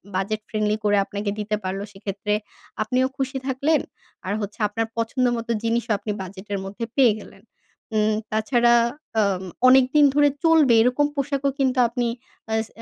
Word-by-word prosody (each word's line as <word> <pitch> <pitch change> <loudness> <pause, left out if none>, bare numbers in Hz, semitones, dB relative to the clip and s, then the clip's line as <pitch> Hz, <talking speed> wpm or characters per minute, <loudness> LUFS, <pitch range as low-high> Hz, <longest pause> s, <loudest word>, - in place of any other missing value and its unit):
Budget 205 +3 -1
friendly 215 0 0
করে 205 -1 +3
আপনাকে 205 +1 -4
দিতে 210 0 -1
পারলো 190 +1 -3
সেক্ষেত্রে 200 +1 -4 0.5
আপনিও 255 +4 +1
খুশি 265 -1 -2
থাকলেন। 280 +4 +1 0.4
আর 190 - -1
হচ্ছে 205 +3 -6
আপনার 225 +2 -2
পছন্দ 230 +3 0
মতো 230 +1 -4
জিনিসও 230 0 0
আপনি 210 +1 -5
বাজেটের 195 +2 -6
মধ্যে 205 +4 -5
পেয়ে 250 -5 +6
গেলেন। 195 0 -15 0.5
উম 215 0 +2 0.2
তাছাড়া 235 +2 +3 0.5
আ - - +5 0.5
অনেকদিন 265 +3 +6
ধরে 290 0 +5
চলবে 320 -7 +5
এরকম 250 +5 +3
পোশাকও 275 0 0
কিন্তু 260 -1 +1
আপনি 240 0 -2 0.4
আ - - 0
স - - -16
230 Hz, 155 wpm, -23 LUFS, 210-260 Hz, 0.5 s, পেয়ে